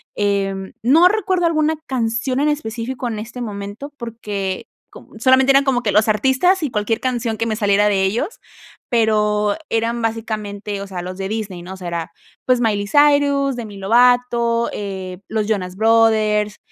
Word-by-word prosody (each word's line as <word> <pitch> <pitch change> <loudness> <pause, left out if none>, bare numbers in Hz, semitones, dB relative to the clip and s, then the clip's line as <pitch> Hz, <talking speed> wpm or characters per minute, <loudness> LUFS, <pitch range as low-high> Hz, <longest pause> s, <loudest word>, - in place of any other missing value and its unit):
em, 195 -1 -1
no 310 +9 +6
recuerdo 375 -3 +1
alguna 315 -1 +1
canción 245 +1 -1
en 295 +2 +2
específico 245 -2 -3
en 220 -3 -4
este 230 +3 -7
momento, 205 +5 -6
porque 210 -5 -4 0.2
con 220 - -14
solamente 260 +1 +5
eran 275 +1 +5
como 260 -3 0
que 205 -4 0
los 215 +1 +3
artistas 265 - +2
y 295 - 0
cualquier 220 +1 -1
canción 240 -4 -2
que 230 - -1
me 220 -1 -1
saliera 205 -1 +2
de 195 -2 +2
ellos, 235 - -2 0.5
pero 210 -3 +2
eran 230 +1 -1
básicamente, 215 -3 -4
o 200 - -6
sea, 185 -2 -5
los 185 +1 -6
de 195 0 -4
Disney, 210 -5 -4
¿no? 185 +2 -8
O - - -9
sea, 180 -2 -7
era, 170 -1 -4 0.3
pues 255 -1 +3
Miley 205 -4 0
Cyrus, 285 -1 +3
Demi 215 -4 -7
Lovato, 235 +2 +2
eh, 190 -3 -6
los 215 -2 -1
Jonas 185 -4 -2
Brothers, 220 -2 +3
225 Hz, 170 wpm, -19 LUFS, 205-255 Hz, 0.5 s, no